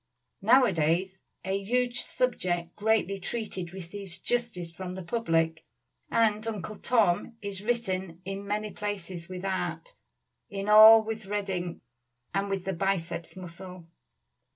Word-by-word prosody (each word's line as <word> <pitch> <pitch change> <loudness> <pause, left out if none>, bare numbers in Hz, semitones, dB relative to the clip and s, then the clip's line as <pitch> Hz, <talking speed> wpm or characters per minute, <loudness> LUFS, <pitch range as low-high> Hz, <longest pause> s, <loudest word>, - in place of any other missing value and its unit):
Nowadays 190 - +3 0.3
a 195 +1 -1
huge 245 +3 +1
subject 175 -9 -1
greatly 210 -2 +1
treated 190 -4 -4
receives 190 0 -7
justice 230 -9 -2
from 180 +1 -6
the 190 - -6
public, 165 -5 0 0.5
and 220 -1 +2
"Uncle 215 -1 -5
Tom" 225 -1 +2
is 200 -1 -4
written 190 -7 -1
in 195 +1 -5
many 210 +1 -2
places 190 -4 -5
with 185 0 -6
art, 195 - -3 0.6
in 200 0 -4
all 220 +1 +10
with 220 -2 -5
red 205 -1 -2
ink 175 -2 -3 0.5
and 195 +1 0
with 195 -2 -2
the 190 - -1
biceps 180 -2 -2
muscle. 180 0 -9
195 Hz, 130 wpm, -28 LUFS, 180-215 Hz, 0.6 s, all